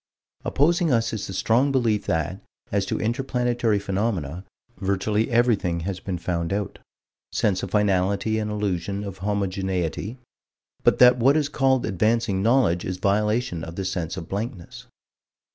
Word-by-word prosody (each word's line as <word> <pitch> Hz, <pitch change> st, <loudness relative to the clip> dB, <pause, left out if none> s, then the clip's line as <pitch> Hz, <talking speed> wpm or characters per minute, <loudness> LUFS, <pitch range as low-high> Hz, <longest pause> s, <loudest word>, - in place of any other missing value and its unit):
Opposing 165 Hz, +3 st, +2 dB
us 115 Hz, -2 st, +1 dB
is 110 Hz, -, -3 dB
the 95 Hz, -, -6 dB
strong 125 Hz, +8 st, +2 dB
belief 115 Hz, -6 st, +1 dB
that, 80 Hz, +4 st, -1 dB, 0.3 s
as 100 Hz, -1 st, 0 dB
to -, -, -1 dB
inter 120 Hz, +5 st, -1 dB
planetary 120 Hz, -4 st, 0 dB
phenomena, 95 Hz, -4 st, -2 dB, 0.3 s
virtually 100 Hz, +3 st, 0 dB
everything 115 Hz, -8 st, +2 dB
has 95 Hz, +2 st, -3 dB
been 95 Hz, -2 st, -4 dB
found 85 Hz, 0 st, -2 dB
out. 100 Hz, 0 st, -3 dB, 0.5 s
Sense 95 Hz, -3 st, +1 dB
of -, -, -4 dB
finality 100 Hz, +1 st, +1 dB
and 105 Hz, -1 st, -2 dB
illusion 100 Hz, -1 st, -2 dB
of 95 Hz, -2 st, -7 dB
homogeneity. 95 Hz, +1 st, -2 dB, 0.7 s
But -, -, +4 dB
that 125 Hz, 0 st, +7 dB
what 135 Hz, +5 st, +4 dB
is 145 Hz, -2 st, 0 dB
called 135 Hz, -3 st, +2 dB
advancing 110 Hz, 0 st, +1 dB
knowledge 110 Hz, -6 st, +3 dB
is 90 Hz, 0 st, -3 dB
violation 105 Hz, -2 st, 0 dB
of 85 Hz, -, -7 dB
the 95 Hz, -, -3 dB
sense 90 Hz, -2 st, -3 dB
of 85 Hz, -3 st, -6 dB
blankness. 100 Hz, -2 st, -6 dB
100 Hz, 150 wpm, -24 LUFS, 95-115 Hz, 0.7 s, that